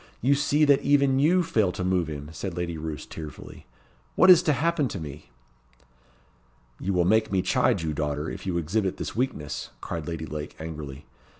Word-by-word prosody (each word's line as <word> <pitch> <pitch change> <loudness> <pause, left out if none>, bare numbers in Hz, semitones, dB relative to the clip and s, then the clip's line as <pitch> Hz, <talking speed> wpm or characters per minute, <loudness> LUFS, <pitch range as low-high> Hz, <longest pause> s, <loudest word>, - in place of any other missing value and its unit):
you 135 +4 +3
see 145 +2 +3
that 140 -2 +4
even 140 -2 +3
you 175 +6 +4
fail 110 - +1
to 90 - -4
move 90 -2 +1
him," 75 -2 -6
said 90 0 -5
Lady 85 -1 -2
Roos, 80 -1 -5
tearfully. 75 -6 -10 0.5
"What 185 - +8
is 175 -2 +8
to 155 -4 +2
happen 160 -1 +1
to 100 - -5
me?" 75 -2 -9 1.5
"You 100 - -2
will 90 -2 +2
make 110 +3 +3
me 95 -2 +1
chide - - +2
you, 80 -1 -1
daughter, 75 +1 -2
if - - -6
you 90 -2 0
exhibit 95 +4 -1
this - - -5
weakness," 110 - -3
cried 80 -3 -5
Lady 80 -2 -4
Lake, 75 0 -6
angrily. 75 -3 -7
90 Hz, 185 wpm, -26 LUFS, -, 1.5 s, What